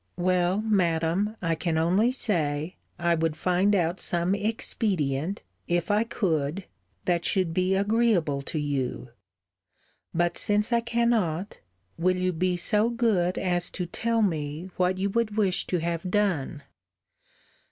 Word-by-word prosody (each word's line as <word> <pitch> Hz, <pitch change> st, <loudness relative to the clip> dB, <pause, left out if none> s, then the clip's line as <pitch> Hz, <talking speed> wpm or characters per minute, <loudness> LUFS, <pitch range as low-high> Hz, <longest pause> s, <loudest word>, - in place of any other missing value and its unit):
Well, 180 Hz, +2 st, +1 dB
Madam, 190 Hz, 0 st, +1 dB
I 165 Hz, -1 st, +1 dB
can 165 Hz, 0 st, -1 dB
only 185 Hz, +9 st, +3 dB
say, 160 Hz, -, -1 dB, 0.2 s
I 170 Hz, 0 st, +2 dB
would 165 Hz, -1 st, 0 dB
find 185 Hz, +4 st, +2 dB
out 175 Hz, 0 st, 0 dB
some 175 Hz, +1 st, 0 dB
expedient, 195 Hz, -, -1 dB, 0.2 s
if 175 Hz, +1 st, 0 dB
I 210 Hz, +2 st, +2 dB
could, 170 Hz, -5 st, -1 dB, 0.4 s
that 175 Hz, -1 st, +1 dB
should 185 Hz, -4 st, 0 dB
be 185 Hz, +2 st, +1 dB
agreeable 200 Hz, -8 st, +2 dB
to 145 Hz, -, -5 dB
you. 140 Hz, -4 st, -2 dB, 1.0 s
But 175 Hz, 0 st, 0 dB
since 210 Hz, +3 st, +1 dB
I 235 Hz, -, +3 dB
cannot, 230 Hz, -6 st, 0 dB, 0.4 s
will 185 Hz, +2 st, +2 dB
you 185 Hz, 0 st, 0 dB
be 180 Hz, +2 st, 0 dB
so 210 Hz, +6 st, +2 dB
good 220 Hz, -7 st, +1 dB
as 175 Hz, -2 st, 0 dB
to 180 Hz, -, -4 dB
tell 230 Hz, +5 st, 0 dB
me 160 Hz, -1 st, -2 dB
what 185 Hz, 0 st, +1 dB
you 195 Hz, +1 st, -1 dB
would 220 Hz, -1 st, -1 dB
wish 195 Hz, -4 st, +1 dB
to 180 Hz, -, 0 dB
have 170 Hz, +2 st, -2 dB
done? 180 Hz, -8 st, 0 dB
180 Hz, 140 wpm, -26 LUFS, 165-205 Hz, 1.0 s, only